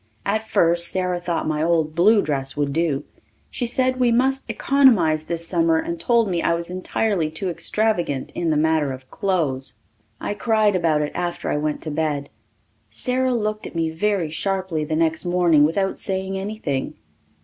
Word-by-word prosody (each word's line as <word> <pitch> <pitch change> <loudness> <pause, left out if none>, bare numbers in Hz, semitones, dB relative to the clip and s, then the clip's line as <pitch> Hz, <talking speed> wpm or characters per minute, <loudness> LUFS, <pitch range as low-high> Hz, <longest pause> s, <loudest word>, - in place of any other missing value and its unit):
At 215 +2 -1
first 170 -2 +2
Sara 180 -1 -1
thought 175 -2 -2
my 155 -1 -1
old 160 -2 +1
blue 205 +5 +4
dress 135 -2 -2
would 145 -1 0
do. 155 -3 0 0.5
She 245 - -2
said 255 +1 0
we 245 -2 +3
must 265 +3 +1
economize 195 - +3
this 170 0 -4
summer 165 -2 +2
and 170 +1 -3
told 230 +4 +2
me 175 -3 -1
I 170 - +2
was 170 +1 -5
entirely 185 -2 -1
too 175 +4 -3
extravagant 175 -8 -1
in 170 -2 -2
the 155 - +2
matter 155 -3 +1
of 130 0 -12
clothes. 150 - -1 0.4
I - - -3
cried 215 -2 +2
about 160 -4 +2
it 145 - -3
after 175 -1 -3
I - - 0
went 150 0 -2
to 155 - -4
bed. 145 -2 -2 0.6
Sara 255 0 0
looked 215 -1 -2
at - - -12
me 165 -1 0
very 175 -1 0
sharply 185 -2 -1
the 155 +1 -2
next 160 0 +1
morning 175 -4 +4
without 195 +5 0
saying 190 0 -1
anything. 190 -9 -3
170 Hz, 175 wpm, -22 LUFS, 155-205 Hz, 0.6 s, blue